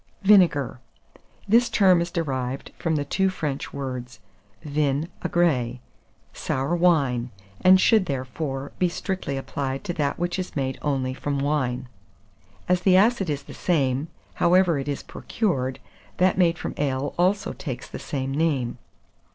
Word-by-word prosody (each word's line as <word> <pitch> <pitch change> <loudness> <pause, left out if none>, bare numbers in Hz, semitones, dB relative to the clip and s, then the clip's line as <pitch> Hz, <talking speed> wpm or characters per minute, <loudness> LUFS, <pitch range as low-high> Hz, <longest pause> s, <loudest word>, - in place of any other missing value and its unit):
VINEGAR. 175 - +4 0.7
This 235 +4 +4
term 185 -4 +4
is 170 - -2
derived 135 -6 -3
from 165 -2 0
the 145 -1 -1
two 190 +6 +1
French 150 -6 -4
words 125 -4 -6 0.4
vin 145 0 0 0.2
aigre, 130 -9 +1 0.6
'sour 135 +6 -1
wine,' 140 -9 +2 0.3
and 185 0 +7
should, 215 -2 +4
therefore, 135 +1 -4
be 180 - +3
strictly 180 -6 -3
applied 135 0 -4
to 175 - -3
that 145 -4 -1
which 175 +1 -2
is 185 - -5
made 135 -2 -2
only 135 -3 -1
from 140 +1 -3
wine. 130 -3 -1 0.8
As 180 0 +2
the 185 0 +5
acid 205 -3 +3
is 145 -1 -2
the - - -11
same, 140 -4 0 0.3
however 175 -3 +4
it 135 - -5
is 140 -1 -3
procured, 135 - -2 0.4
that 185 0 +3
made 175 -2 +3
from - - -5
ale 140 -1 -1
also 190 +3 +1
takes 130 -5 -6
the - - -8
same 135 -2 -3
name. 135 -5 0
145 Hz, 145 wpm, -24 LUFS, 135-180 Hz, 0.8 s, and